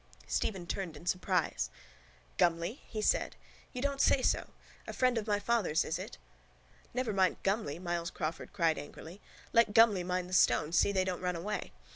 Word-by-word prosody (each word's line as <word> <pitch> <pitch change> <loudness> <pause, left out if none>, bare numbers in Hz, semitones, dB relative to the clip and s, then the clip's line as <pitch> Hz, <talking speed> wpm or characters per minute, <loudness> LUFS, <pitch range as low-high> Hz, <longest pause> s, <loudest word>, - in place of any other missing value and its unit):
Stephen 190 -5 -1
turned 170 -3 -4
in 170 - -13
surprise. 180 - 0 0.7
—Gumley? 175 - +1
he 215 -2 -4
said. - - +1 0.4
You 250 - -5
don't 280 0 0
say 260 - +4
so? - - +1 0.4
A - - -5
friend 255 -1 +2
of 225 -1 -2
my 205 -1 +2
father's, 205 -6 +1
is - - -2
it? - - -7 0.7
—Never 250 -3 -1
mind 190 -2 +2
Gumley, 195 -7 0
Myles 175 -1 -2
Crawford 160 0 -4
cried 165 -4 +1
angrily. 165 +6 -10 0.3
Let 230 -3 +4
Gumley 220 -5 +6
mind 180 0 -2
the 185 - -9
stones, 165 -2 +3
see - - +4
they 190 -2 +1
don't 185 -1 -3
run 180 -1 -1
away. 190 +6 -4
185 Hz, 175 wpm, -32 LUFS, 170-215 Hz, 0.7 s, Gumley